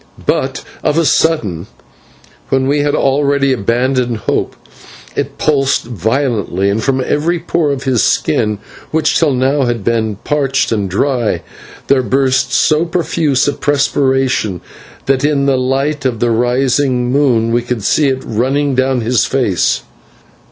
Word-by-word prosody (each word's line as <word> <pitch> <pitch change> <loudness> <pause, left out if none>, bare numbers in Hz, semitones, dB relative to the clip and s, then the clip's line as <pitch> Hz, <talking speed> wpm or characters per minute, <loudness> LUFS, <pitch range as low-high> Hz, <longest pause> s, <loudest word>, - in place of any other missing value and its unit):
But - - -1 0.2
of 150 - 0
a 165 - +2
sudden, 105 - +1 0.8
when 130 0 +1
we 145 +2 +1
had 145 0 +1
already 140 0 +2
abandoned 125 +2 0
hope, 105 - -2 0.6
it - - -3
pulsed 140 -3 +1
violently, 110 - -1
and 110 +2 -1
from 135 -1 +1
every 155 +6 0
pore 165 -2 -1
of 135 -1 -3
his 130 -5 +1
skin, 105 -1 +1 0.3
which 160 0 +1
till 160 -3 +2
now 135 +2 +1
had 120 -4 -2
been 110 -1 0
parched 135 -4 0
and 105 -4 -1
dry, 120 +4 0 0.4
there 140 -1 +3
burst 130 0 +1
so 155 +1 +2
profuse 165 -5 0
a 145 - +1
perspiration 135 - 0 0.4
that 135 0 +1
in 145 -2 +1
the 140 -1 +2
light 135 +3 -1
of 125 -4 -1
the 120 0 +1
rising 125 +1 +1
moon 125 -5 +2
we 120 +1 +2
could 120 -3 -4
see 150 +7 +2
it 130 -1 -1
running 135 +5 0
down 130 -1 +1
his 115 +1 +1
face. 120 -10 0
130 Hz, 145 wpm, -14 LUFS, 120-145 Hz, 0.8 s, there